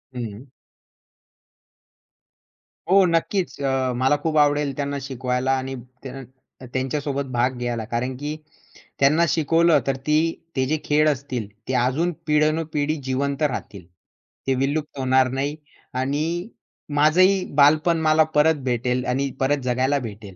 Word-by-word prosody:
हं. 120 +1 -6 2.4
हो 195 0 +6
नक्कीच. 170 +1 0
अ, 135 -1 0
मला 130 +3 +3
खूप 155 -1 0
आवडेल 145 -1 +2
त्यांना 140 0 -2
शिकवायला 130 -1 -2
आणि 135 0 -4 0.3
त्यां 135 0 -7 0.5
त्यांच्यासोबत 140 +1 -2
भाग 125 +1 0
घ्यायला 120 -2 -3
कारण, 120 +3 -3
की 150 +3 -4 0.6
त्यांना 150 +5 +4
शिकवलं 165 +2 +3
तर 135 - +1
ती 150 0 +4 0.4
ते 130 -1 +1
जे 155 +3 +1
खेळ 150 +1 +3
असतील 130 -6 -3 0.2
ते 130 - -2
अजून 160 +7 0 0.2
पिढ्यानपिढी 155 0 +1
जिवंत 140 +2 -2
राहतील, 105 - -3 0.6
ते 135 - +2
विलुप्त 145 +2 -2
होणार 130 0 +3
नाही. 140 +3 -2 0.4
आणि 155 - -2 0.5
माझंही 185 +5 +4
बालपण 155 +3 +4
मला 155 0 +4
परत 150 -1 +3
भेटेल 125 0 -1
आणि 135 +2 0
परत 135 +1 +1
जगायला 130 +3 +1
भेटेल. 105 -5 -9
140 Hz, 125 wpm, -23 LUFS, 130-155 Hz, 2.4 s, हो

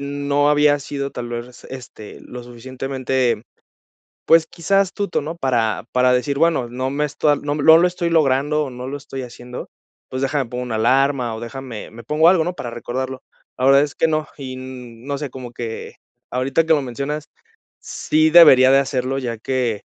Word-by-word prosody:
no 145 +1 0
había 150 0 +4
sido 140 0 -5
tal 120 -1 -6
vez, 120 0 -5
res 125 - -16
este, 120 -5 -10
lo 125 0 -9
suficientemente, 130 0 -2 0.8
pues, 165 0 +5
quizá 195 +3 +1
astuto, 200 -2 -1
¿no?, 160 +4 -6
para 120 -8 0
para 125 0 +3
decir, 140 +3 0
bueno, 160 -7 +2
no 130 +2 -3
me 150 +2 -1
están 145 0 +1
no 145 0 -2
no 160 +2 +7
lo 180 - +4
estoy 175 -1 -2
logrando, 150 -1 +2
o 135 - -6
no 125 0 -7
lo 145 - -4
estoy 135 -2 -7
haciendo, 125 0 -9 0.4
pues 130 +1 -4
déjame 135 -2 -1
pongo 125 +1 -4
una 120 -3 -4
alarma, 125 +1 +2
o 110 - -7
déjame 120 -2 -7
me 115 +1 -12
pongo 155 +7 +3
algo, 175 -2 +4
¿no? 180 - -2
para 120 - -6
recordarlo. 130 +2 -5 0.4
La 130 - -1
verdad 135 +1 +6
es 145 -1 -3
que - - +2
no, 155 -1 0
y 130 -2 -6
n 125 -2 -10
no 140 -1 -2
sé, 145 -3 -5
como 130 -2 -8
que 115 -2 -7 0.3
ahorita 130 +6 +1
que 160 - +3
lo 145 - 0
mencionas, 140 +4 -4 0.5
sí 155 +1 +1
debería 140 -6 +8
de 135 - +6
hacerlo, 135 -1 -1
ya 120 -3 -4
que, 120 -3 -2
135 Hz, 190 wpm, -20 LUFS, 125-150 Hz, 0.8 s, debería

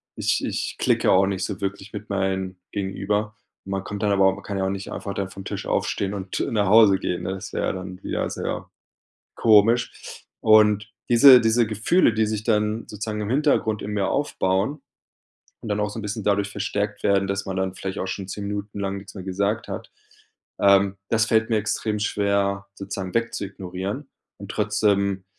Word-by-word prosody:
ich - - 0
ich - - -3
klicke - - +2
auch 95 +1 +5
nicht 95 -1 -2
so 100 -3 -6
wirklich 100 +1 -4
mit 105 +1 -7
meinen 95 -1 -2
Gegenüber.“ 105 +2 -2 0.3
Man 95 0 -3
kommt 100 +1 -6
dann 105 - +2
aber 100 -1 +4
auch 95 - +3
man 100 - -10
kann 100 -2 -4
ja 95 - 0
auch 95 - 0
nicht 100 0 -5
einfach 100 - -5
dann 100 -1 -3
vom 95 0 -10
Tisch - - -5
aufstehen 100 0 -1
und 95 -1 -4
nach 105 -3 +2
Hause 105 -2 +7
gehen, 90 0 -2
ne, 95 +2 -2
das 95 - -8
wäre - - -1
dann 95 0 -7
wieder - - -2
sehr - - -4 0.7
komisch. 115 +2 +4 0.5
Und 110 0 +4 0.2
diese 125 +1 +9
diese 115 0 +3
Gefühle, 115 - +2
die 110 0 +2
sich 110 0 -3
dann 105 0 0
sozusagen 105 0 -4
im 105 - -4
Hintergrund 130 -6 +1
in 105 - -5
mir 100 -2 0
aufbauen 110 -1 0 0.8
und 110 - -7
dann 105 - 0
auch 105 0 0
so 105 - -8
'n - - -5
bisschen 105 +1 -4
dadurch 100 -1 +1
verstärkt 105 0 -2
werden, 100 -1 +3
dass 100 +1 -2
man 95 -1 -4
dann 95 -1 -1
vielleicht 95 0 -5
auch 95 - -2
schon 95 0 -5
10 100 +1 -5
Minuten 105 0 -5
lang 100 0 -2
nix 100 - -11
mehr 95 - -7
gesagt 100 +4 -1
hat, - - -7 0.7
ähm, 100 0 +4
das 110 0 +3
fällt 110 +1 +2
mir 110 - +2
extrem 105 0 -1
schwer, 100 -1 0
sozusagen 100 -2 -5
weg 115 0 0
zu 100 - -3
ignorieren 95 +7 -5 0.3
und - - -10
trotzdem, 100 -2 +1
100 Hz, 195 wpm, -24 LUFS, 95-110 Hz, 0.8 s, diese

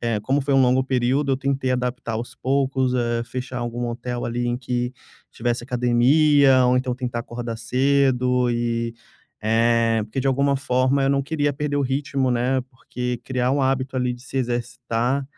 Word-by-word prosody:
eh, 115 -3 0
como 135 +7 0
foi 140 +1 -1
um 135 - +5
longo 125 +1 +3
período 130 +2 0
eu 130 - +2
tentei 135 -1 -1
adaptar 125 -2 -2
aos 120 +3 -5
poucos, 135 -1 0
eh, 120 -1 0
fechar 125 +2 -5
algum 120 0 -3
hotel, 120 +1 -4
ali, 120 +1 -2
em 120 0 0
que 125 0 -2 0.4
tivesse 120 0 -2
academia 130 +3 +4
ou, 125 - +3
então, 125 0 0
tentar 125 -2 -3
acordar 120 -1 -6
cedo 125 0 +2
e 115 -1 -1 0.5
eh, 115 0 +2
porque 110 +5 -7
de 135 - -2
alguma 140 +1 +2
forma 130 0 +1
eu - - +2
não 140 0 +1
queria 145 0 0
perder 145 +1 -2
o 145 - +1
ritmo, 135 0 -1
né, 125 +2 +1
porque 125 -1 -5
criar 125 -1 0
um 140 0 +1
hábito, 130 0 0
ali, 125 -1 0
de 120 - -14
se 135 - -8
exercitar, 120 +1 -1
125 Hz, 180 wpm, -22 LUFS, 120-135 Hz, 0.5 s, um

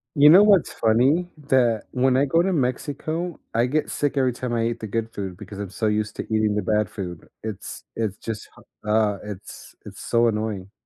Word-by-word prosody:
You 145 +1 +8
know 190 +6 +9
what's 200 -4 +4
funny? 135 +11 +2
That 130 -6 +2
when 130 0 +2
I 140 - +3
go 165 +5 +3
to 190 +2 +1
Mexico, 155 +4 -2
I 115 +2 +3
get 150 +4 -1
sick 145 -1 -1
every 130 -2 +2
time 125 0 -4
I 115 -1 +1
eat 115 0 -2
the 110 - -4
good 115 +2 -3
food 95 -3 -5
because 100 -1 -10
I'm 100 - -4
so 110 +3 -2
used 105 0 -1
to - - -2
eating 110 -1 +1
the 105 - +1
bad 105 0 +1
food. 90 -5 -7
It's 110 -4 -7
it's 105 -3 -2
just 110 -2 -6 0.3
hu 105 - -6
uh, 105 -2 +2
it's 105 -2 -9
it's - - -10
so 120 0 +2
annoying. 105 -3 -2
115 Hz, 210 wpm, -23 LUFS, 105-135 Hz, 0.3 s, know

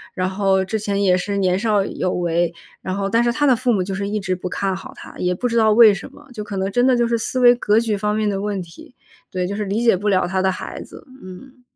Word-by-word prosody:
然 185 0 -1
后 190 0 +1
之 220 +3 -2
前 200 -1 -1
也 185 -2 +4
是 200 +3 -2
年 185 -1 +1
少 210 -2 +1
有 185 - -2
为， 170 -1 0 0.3
然 185 +1 -4
后 200 -1 -1
但 230 +4 +2
是 240 - +2
他 290 +4 0
的 260 -3 +5
父 250 +1 0
母 200 -5 +1
就 195 +1 -5
是 200 +1 -3
一 210 +1 -2
直 185 -2 -2
不 180 0 -6
看 195 +1 -2
好 195 - -9
他， - - -12
也 180 0 0
不 245 - -2
知 235 - -3
道 220 -2 +4
为 220 -1 +7
什 195 - -8
么， 295 - -17
就 215 -3 -6
可 205 -1 -6
能 190 +1 -2
真 245 +4 +2
的 255 -2 +3
就 240 -1 +2
是 235 - 0
思 255 +3 -3
维 245 -1 +7
格 220 -3 +2
局 225 -2 -1
方 210 +1 -1
面 215 0 0
的 195 -1 -1
问 205 -1 -2
题。 170 +8 -15 0.3
对， 180 -1 -2
就 200 +3 -4
是 210 0 -3
理 205 +4 -2
解 230 -4 +4
不 205 +3 -2
了 185 -2 +2
他 190 +1 -1
的 190 0 +2
孩 - - -7
子。 - - -13 0.2
嗯。 250 +8 -12
200 Hz, 310 characters per minute, -20 LUFS, 190-230 Hz, 0.3 s, 为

